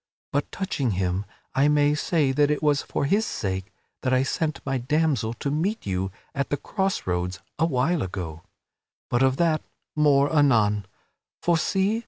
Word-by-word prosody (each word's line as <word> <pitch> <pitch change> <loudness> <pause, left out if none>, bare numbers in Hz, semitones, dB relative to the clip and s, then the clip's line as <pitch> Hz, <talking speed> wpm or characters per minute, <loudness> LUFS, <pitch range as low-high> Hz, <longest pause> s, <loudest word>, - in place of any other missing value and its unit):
But 145 +1 -1
touching 140 - -1
him, 95 +1 -1 0.3
I 135 +2 +4
may 145 0 +4
say 150 -2 +1
that 145 +2 +3
it 150 +1 0
was 145 -2 +3
for - - -2
his 205 +9 +2
sake 95 - -3 0.3
that 130 - 0
I 130 0 +4
sent 155 +2 -1
my 135 -1 0
damsel 130 -4 +1
to 140 +4 -3
meet 180 +9 -1
you 95 -1 -1 0.2
at 140 0 -2
the 145 - 0
cross 195 +5 -2
roads 90 +1 -1 0.2
awhile 160 +1 +2
ago. 90 -4 -5 0.7
But 120 - +2
of 130 0 +3
that, 165 -2 +2 0.3
more 145 0 +4
anon; 105 -8 +3 0.6
for 175 - +3
see! 195 +6 +1
140 Hz, 165 wpm, -25 LUFS, 105-155 Hz, 0.7 s, I